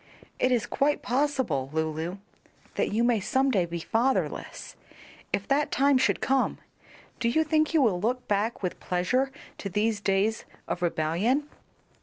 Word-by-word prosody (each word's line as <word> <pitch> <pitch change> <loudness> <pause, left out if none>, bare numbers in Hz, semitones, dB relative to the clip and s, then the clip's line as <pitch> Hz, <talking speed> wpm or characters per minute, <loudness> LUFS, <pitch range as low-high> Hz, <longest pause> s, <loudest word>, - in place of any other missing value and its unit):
It 255 - +2
is 240 -3 +2
quite 290 +1 0
possible, 250 - 0
Lulu, 160 +3 -2 0.6
that - - 0
you 220 +3 +1
may 240 -2 +3
some 265 +7 +1
day 185 -7 +2
be 170 0 -4
fatherless; 245 +9 -1 0.6
if 200 0 -1
that 285 +2 +1
time 275 -1 +4
should 260 - +1
come, 270 0 +1 0.6
do 235 - +1
you 315 +7 +3
think 310 0 +2
you 320 -4 +4
will 185 -7 +2
look 250 +4 -1
back 210 +2 -1
with 180 - -3
pleasure 250 +10 0 0.3
to 200 - -4
these 210 +1 0
days 205 +3 +1 0.2
of 175 - -3
rebellion?" 175 - +1
225 Hz, 155 wpm, -27 LUFS, 185-265 Hz, 0.6 s, time